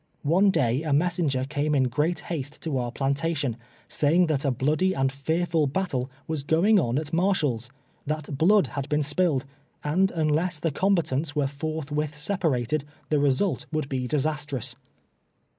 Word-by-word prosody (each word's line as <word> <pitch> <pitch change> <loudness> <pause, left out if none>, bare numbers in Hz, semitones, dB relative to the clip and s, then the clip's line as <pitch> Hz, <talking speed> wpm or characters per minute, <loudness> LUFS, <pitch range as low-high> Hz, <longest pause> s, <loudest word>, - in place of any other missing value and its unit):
One 180 +7 +4
day 130 -6 +2
a 155 -3 -1
messenger 155 -4 +1
came 145 +2 0
in 135 - +4
great 150 +7 0
haste 145 -4 -5
to 150 -5 -1
our 120 -1 -2
plantation, 140 0 -1 0.3
saying 165 +5 +3
that 155 -4 0
a 140 - +2
bloody 155 +9 +1
and 135 0 +1
fearful 160 +3 0
battle 135 -5 -1 0.2
was 160 -2 -2
going 170 +9 +4
on 120 -5 0
at 150 0 -3
Mar 185 +4 +3
shall's 125 -8 -1 0.2
— - - -32
that 155 -1 -3
blood 190 +6 +4
had 135 +1 -5
been 150 0 +2
si^illed 150 -2 +1 0.3
— - - -40
and 180 +6 +2
unless 160 +1 0
the 165 +1 0
combatants 160 -4 0
were 145 -2 +2
forthwith 150 +1 -3
separated, 150 - 0 0.3
the 150 - +2
result 145 +7 +1
would 155 -3 -2
be 130 -2 -2
disastrous. 145 -4 -1
150 Hz, 165 wpm, -26 LUFS, 135-165 Hz, 0.3 s, One